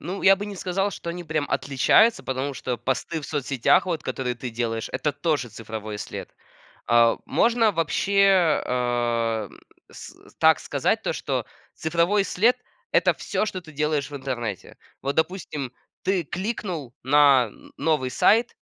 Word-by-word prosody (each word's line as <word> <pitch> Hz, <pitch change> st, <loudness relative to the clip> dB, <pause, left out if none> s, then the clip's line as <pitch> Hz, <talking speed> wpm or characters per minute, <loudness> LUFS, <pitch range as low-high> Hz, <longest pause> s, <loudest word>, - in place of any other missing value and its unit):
Ну, 185 Hz, +5 st, -5 dB
я 195 Hz, 0 st, +7 dB
бы 200 Hz, -, -5 dB
не 200 Hz, -2 st, -7 dB
сказал, 195 Hz, +3 st, -1 dB
что 170 Hz, -, -6 dB
они 175 Hz, +1 st, -6 dB
прям 155 Hz, -2 st, -1 dB
отличаются, 205 Hz, -, +3 dB
потому 130 Hz, +2 st, -2 dB
что 125 Hz, -1 st, -3 dB
посты 135 Hz, +7 st, -2 dB
в 145 Hz, -, -8 dB
соцсетях, 140 Hz, 0 st, +2 dB
вот 170 Hz, -4 st, -2 dB
которые 125 Hz, -1 st, -3 dB
ты 120 Hz, +1 st, -6 dB
делаешь, 115 Hz, -1 st, -3 dB
это 150 Hz, -, -1 dB
тоже 145 Hz, -3 st, -1 dB
цифровой 110 Hz, -2 st, -7 dB
след. -, -, -7 dB, 0.5 s
Э, 115 Hz, 0 st, +5 dB
можно 230 Hz, -2 st, +3 dB
вообще, 185 Hz, 0 st, +3 dB
эм, 120 Hz, -3 st, -1 dB, 0.3 s
с -, -, -11 dB, 0.2 s
так -, -, +5 dB
сказать -, -, 0 dB
то, -, -, -1 dB
что -, -, -3 dB, 0.3 s
цифровой 170 Hz, +5 st, +1 dB
след- 230 Hz, +8 st, +2 dB, 0.4 s
это -, -, +4 dB
всё, 215 Hz, -, -2 dB
что 185 Hz, -, -4 dB
ты 160 Hz, -3 st, -14 dB
делаешь 150 Hz, -1 st, -1 dB
в 145 Hz, -, -6 dB
интернете. 120 Hz, -7 st, -5 dB, 0.3 s
Вот, 140 Hz, +1 st, -1 dB
допустим, 160 Hz, -6 st, -2 dB, 0.3 s
ты 185 Hz, -3 st, 0 dB
кликнул 180 Hz, -, -4 dB
на 135 Hz, -4 st, +5 dB, 0.3 s
новый 145 Hz, -4 st, +1 dB
сайт, 230 Hz, -, +3 dB
150 Hz, 150 wpm, -24 LUFS, 125-180 Hz, 0.5 s, я